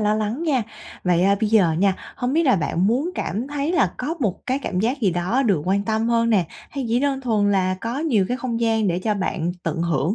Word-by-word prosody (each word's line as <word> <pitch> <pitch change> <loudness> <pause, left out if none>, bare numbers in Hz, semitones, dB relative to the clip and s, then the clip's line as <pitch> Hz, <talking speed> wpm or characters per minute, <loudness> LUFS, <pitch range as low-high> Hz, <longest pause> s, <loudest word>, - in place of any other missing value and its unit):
lo 210 0 +2
lắng 215 +8 -2
nha. 280 -7 +1 0.4
Vậy, 175 -1 +3
à, 200 +1 +4
bây 220 - +1
giờ 195 -7 +4
nha, 195 0 +3 0.2
hông 245 +1 -1
biết 330 +3 +3
là 260 -9 +4
bạn 170 +3 0
muốn 260 - +1
cảm 220 +7 -3
thấy 290 +3 -2
là 360 - +2
có 295 +6 -3
một 200 -2 -2
cái 260 0 0
cảm 185 -9 -2
giác 245 +6 0
gì 205 -5 +3
đó 180 +10 0
được 195 - +1
quan 195 +2 +1
tâm 220 +1 0
hơn 230 0 +2
nè, 200 -6 +3 0.3
hay 275 -3 -4
chỉ 235 +2 +2
đơn 275 -1 0
thuần 215 -5 +1
là 185 -1 +1
có 235 +4 -3
nhiều 270 -11 +2
cái 250 - -1
không 235 -2 -3
gian 225 -2 +2
để 175 0 0
cho 210 +3 -1
bạn 175 -3 -2
tận 165 - -2
hưởng 170 +2 0
220 Hz, 255 wpm, -22 LUFS, 190-255 Hz, 0.4 s, à